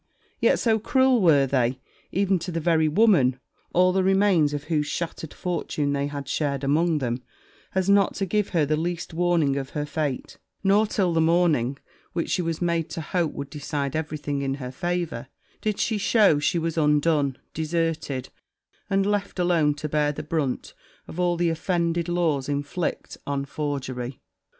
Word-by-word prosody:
Yet -, -, +4 dB
so 225 Hz, -2 st, +2 dB
cruel 260 Hz, +1 st, +3 dB
were 150 Hz, -6 st, +5 dB
they, 125 Hz, -1 st, 0 dB, 0.3 s
even 195 Hz, 0 st, +1 dB
to 170 Hz, +2 st, -5 dB
the 165 Hz, -, -2 dB
very 160 Hz, -1 st, +2 dB
woman, 155 Hz, -, +4 dB, 0.3 s
all 180 Hz, +1 st, +4 dB
the 190 Hz, 0 st, +2 dB
remains 190 Hz, -5 st, +3 dB
of 145 Hz, -1 st, -3 dB
whose 150 Hz, -1 st, 0 dB
shattered 165 Hz, -1 st, -4 dB
fortune 155 Hz, -5 st, -2 dB
they 140 Hz, 0 st, 0 dB
had 140 Hz, -1 st, -6 dB
shared 140 Hz, -2 st, -1 dB
among 155 Hz, +4 st, +2 dB
them, 125 Hz, -3 st, -2 dB, 0.5 s
as 190 Hz, -1 st, +1 dB
not 200 Hz, 0 st, +4 dB
to 195 Hz, -, -1 dB
give 210 Hz, +2 st, 0 dB
her 165 Hz, -5 st, +2 dB
the 155 Hz, +2 st, +1 dB
least 170 Hz, +2 st, -3 dB
warning 165 Hz, -5 st, +2 dB
of 135 Hz, -1 st, -4 dB
her 145 Hz, -, -1 dB
fate; 145 Hz, -2 st, -3 dB, 0.2 s
nor, 205 Hz, +2 st, +4 dB
till 185 Hz, -4 st, +1 dB
the 165 Hz, -, +3 dB
morning 160 Hz, -6 st, +2 dB, 0.4 s
which 170 Hz, -, -2 dB
she 185 Hz, -, +1 dB
was 165 Hz, 0 st, -2 dB
made 170 Hz, -2 st, 0 dB
to 165 Hz, -, -5 dB
hope 165 Hz, 0 st, -1 dB
would 140 Hz, -1 st, -6 dB
decide 145 Hz, -1 st, -3 dB
every 155 Hz, -1 st, -2 dB
thing 145 Hz, -1 st, -3 dB
in 135 Hz, -1 st, -1 dB
her 125 Hz, -2 st, -6 dB
favour, 170 Hz, -4 st, -3 dB, 0.3 s
did 215 Hz, -2 st, -1 dB
she 220 Hz, -3 st, 0 dB, 0.2 s
know 195 Hz, -9 st, +6 dB
she 150 Hz, -, +1 dB
was 165 Hz, 0 st, -1 dB
undone, 150 Hz, -2 st, +2 dB, 0.2 s
deserted, 160 Hz, -4 st, -2 dB, 0.6 s
and 195 Hz, 0 st, +2 dB
left 205 Hz, -1 st, -1 dB
alone 170 Hz, -5 st, +2 dB
to 150 Hz, +1 st, -4 dB
bear 150 Hz, 0 st, +1 dB
the 155 Hz, +1 st, -6 dB
brunt 150 Hz, -4 st, -2 dB, 0.3 s
of 170 Hz, -, -8 dB
all 175 Hz, -1 st, +2 dB
the 170 Hz, -1 st, +2 dB
offended 170 Hz, 0 st, -1 dB
laws 160 Hz, -6 st, 0 dB
inflict 145 Hz, +4 st, -3 dB
on 140 Hz, -1 st, -1 dB
forgery. 135 Hz, -4 st, -4 dB
160 Hz, 175 wpm, -25 LUFS, 145-175 Hz, 0.6 s, know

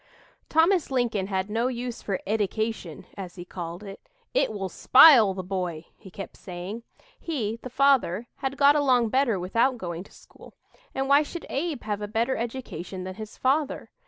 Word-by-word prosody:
Thomas 330 Hz, +2 st, +3 dB
Lincoln 235 Hz, -7 st, 0 dB
had 190 Hz, -1 st, -1 dB
no 225 Hz, +3 st, 0 dB
use 245 Hz, -1 st, -4 dB
for 195 Hz, -2 st, -2 dB
"eddication," 215 Hz, -5 st, -2 dB
as 185 Hz, -3 st, -8 dB
he 175 Hz, -1 st, -8 dB
called 175 Hz, +1 st, -7 dB
it. 195 Hz, -1 st, -9 dB, 0.3 s
"It -, -, +2 dB
will 195 Hz, -3 st, -3 dB
spile 235 Hz, -, +7 dB
the 185 Hz, -, -4 dB
boy," 180 Hz, -4 st, -4 dB
he 195 Hz, -, -14 dB
kept 195 Hz, +2 st, -8 dB
saying. 185 Hz, +5 st, -7 dB, 0.4 s
He 230 Hz, -9 st, -3 dB
the 255 Hz, -, -7 dB
father 255 Hz, -6 st, +2 dB
had 270 Hz, 0 st, -3 dB
got 285 Hz, +1 st, +6 dB
along 255 Hz, -6 st, +3 dB
better 255 Hz, -5 st, +2 dB
without 230 Hz, +8 st, +1 dB
going 175 Hz, -4 st, -5 dB
to -, -, -19 dB
school, -, -, -17 dB, 0.4 s
and 270 Hz, 0 st, -1 dB
why 280 Hz, +1 st, +6 dB
should 330 Hz, +3 st, -6 dB
Abe 290 Hz, -1 st, -2 dB
have 210 Hz, -1 st, -3 dB
a 210 Hz, -, -3 dB
better 230 Hz, +5 st, 0 dB
education 225 Hz, -7 st, -5 dB
than 185 Hz, 0 st, -5 dB
his 215 Hz, +2 st, -9 dB
father? 280 Hz, +2 st, 0 dB
220 Hz, 175 wpm, -26 LUFS, 190-265 Hz, 0.4 s, spile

